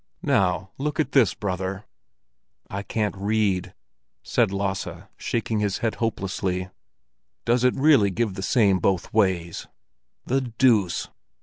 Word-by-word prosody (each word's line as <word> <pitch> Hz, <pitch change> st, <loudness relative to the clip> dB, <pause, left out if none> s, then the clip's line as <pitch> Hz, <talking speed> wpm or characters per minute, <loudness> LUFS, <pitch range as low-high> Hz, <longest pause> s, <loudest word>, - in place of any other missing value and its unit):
"Now, 95 Hz, 0 st, +1 dB
look 150 Hz, +2 st, -2 dB
at 155 Hz, -, +1 dB
this, 125 Hz, -9 st, +4 dB
brother!" 95 Hz, +1 st, -3 dB, 0.9 s
"I 100 Hz, -, -3 dB
can't 105 Hz, +1 st, -2 dB
read," 100 Hz, -2 st, 0 dB, 0.5 s
said -, -, +1 dB
Lasse, 100 Hz, -1 st, -2 dB, 0.3 s
shaking 115 Hz, -2 st, -2 dB
his 100 Hz, -2 st, 0 dB
head 115 Hz, -2 st, -1 dB
hopelessly. 95 Hz, -4 st, -2 dB, 0.8 s
"Does 120 Hz, +1 st, +2 dB
it 125 Hz, -, +3 dB
really 135 Hz, -8 st, +5 dB
give 105 Hz, +1 st, -1 dB
the 95 Hz, -, -6 dB
same 100 Hz, -2 st, +3 dB
both 95 Hz, 0 st, 0 dB
ways? 95 Hz, -5 st, 0 dB, 0.6 s
The 135 Hz, +2 st, +1 dB
deuce! 115 Hz, -7 st, +2 dB
100 Hz, 125 wpm, -24 LUFS, 95-115 Hz, 0.9 s, really